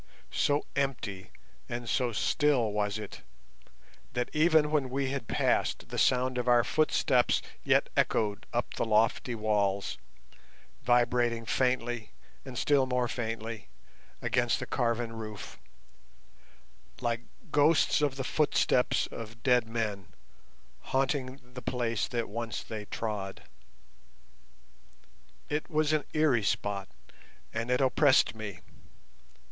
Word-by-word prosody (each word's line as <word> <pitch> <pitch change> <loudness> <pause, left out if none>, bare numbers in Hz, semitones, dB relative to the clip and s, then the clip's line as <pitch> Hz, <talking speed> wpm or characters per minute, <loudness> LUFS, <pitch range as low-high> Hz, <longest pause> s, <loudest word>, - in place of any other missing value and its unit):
So 145 +1 +1
empty 125 -9 -2 0.4
and 120 0 -4
so 125 0 +1
still 125 0 +2
was 105 0 -1
it, 105 -2 -8 0.9
that 125 -1 -2
even 155 -1 +4
when 145 -4 +1
we 135 +1 -1
had 135 -5 -4
passed - - 0
the - - -3
sound 125 0 +2
of 125 - -2
our 120 -1 +5
footsteps 140 -4 +2 0.2
yet - - +3
echoed 105 -1 +1
up 120 0 -2
the - - -1
lofty 115 +2 +2
walls, 100 -2 0 0.8
vibrating 120 -1 +2
faintly 120 -2 0 0.3
and 130 -3 -8
still 140 -1 +3
more 125 -1 +1
faintly 115 -3 -4 0.6
against 120 -1 +1
the - - -4
carven 115 -1 -1
roof, 110 -2 -8 1.4
like 120 -1 -1 0.3
ghosts 150 +1 +4
of 145 -3 +1
the 135 - -3
footsteps 135 -3 +2
of 115 0 -9
dead 125 -3 +3
men 105 -5 -3 0.7
haunting 135 0 -1
the 125 - -7
place 120 -4 -1
that 120 -2 -2
once 115 +1 -4
they 110 -2 -6
trod. 105 -3 -4 2.0
It 150 +1 -2
was 155 -1 +1
an 155 - +1
eerie 150 -7 +3
spot, 100 -1 -1 0.6
and 115 +1 -2
it 125 +2 +2
oppressed 135 +1 +4
me. 105 -5 -7
120 Hz, 120 wpm, -30 LUFS, 110-135 Hz, 2.0 s, our